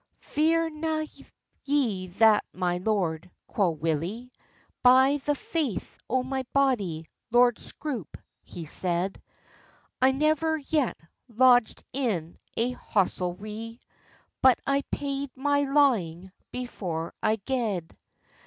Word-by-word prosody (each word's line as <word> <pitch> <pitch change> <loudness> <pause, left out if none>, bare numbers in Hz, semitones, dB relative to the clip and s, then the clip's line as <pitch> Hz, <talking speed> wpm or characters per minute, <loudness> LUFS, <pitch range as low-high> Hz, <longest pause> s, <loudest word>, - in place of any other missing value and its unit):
"Fear 325 +2 +2
na 310 0 -1 0.6
ye 240 -10 0
that, 210 +3 +4
my 180 -1 -1
lord," 180 -4 -1 0.2
quo 195 -4 +1
Willie: 165 +10 -2 0.5
"By 265 +3 +6
the 290 - +3
faith 290 - -3
o 255 +1 +1
my 265 0 -2
body, 205 - +1 0.2
Lord 240 0 +4
Scroope," 255 - -6 0.2
he 170 - -9
said, 180 +4 -2 0.8
"I 260 +1 +6
never 310 +3 +2
yet 295 -3 0 0.3
lodged 245 0 +4
in 205 - -2 0.2
a 235 +2 +1
hostelrie— 210 +1 -2 0.6
But 260 -2 +6
I 275 0 +2
paid 280 -1 -2
my 285 +1 +1
lawing 205 - +2 0.2
before 180 -10 -4
I 220 0 +2
gaed." 215 -6 -2
240 Hz, 105 wpm, -27 LUFS, 185-275 Hz, 0.8 s, By